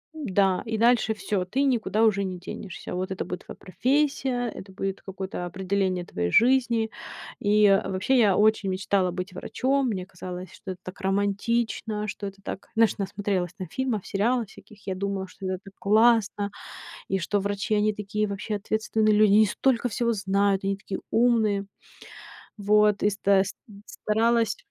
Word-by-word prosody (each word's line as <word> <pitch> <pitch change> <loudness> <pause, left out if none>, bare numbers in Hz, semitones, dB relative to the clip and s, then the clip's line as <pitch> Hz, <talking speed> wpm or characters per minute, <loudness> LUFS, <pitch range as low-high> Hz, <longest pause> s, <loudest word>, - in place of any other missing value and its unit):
м-да, 195 -10 +1
и 220 -1 -2
дальше 230 0 +3
всё, 205 -3 -2
ты 255 +9 -1
никуда 225 -5 +1
уже 200 -3 +3
не 185 -2 -4
денешься. 185 0 -7
Вот 185 +2 -3
это 190 - -3
будет 180 +1 -6
твоя - - -9
профессия, 265 - 0
это 195 -2 -10
будет 195 0 -4
какое-то 190 -2 -5
определение 185 0 -1
твоей 85 - -2
жизни. 235 -2 +3 0.5
И 210 0 +4 0.2
вообще, 195 +7 +1
я 205 -5 +4
очень 210 -2 +3
мечтала 185 0 0
быть 180 +1 -5
врачом. 265 +8 0
Мне 185 -4 -3
казалось, 180 0 -8
что 195 - -8
это 185 - -8
так 185 - -9
романтично, 210 +2 -1
что 205 -1 -5
это 195 0 -10
так, 195 - -7
знаешь, 225 -2 +3
насмотрелась 195 -3 -2
там 185 -3 -7
фильмов, 245 -2 -2
сериала 230 +4 +1
всяких. 210 0 -17
Я 190 - -1
думала, 195 0 -3
что 190 - -11
это 185 -1 -2
так 195 - -12
классно, 215 -1 +3 0.6
и 195 - 0
что 200 +3 0
врачи 200 +2 -1
они 210 0 +2
такие 210 +1 -2
вообще 200 +2 -4
ответственные 215 +1 +1
люди, 210 -1 +5
они 215 +1 +6
столько 245 +4 +1
всего 235 +1 0
знают, 195 -1 +1
они 195 0 0
такие 195 0 -6
умные. 220 -4 +2 0.9
Вот. 210 0 +3
И 205 - +5
ста 200 -1 +3
ст 195 - -7 0.3
старалась 225 0 +1
205 Hz, 165 wpm, -26 LUFS, 190-220 Hz, 0.9 s, они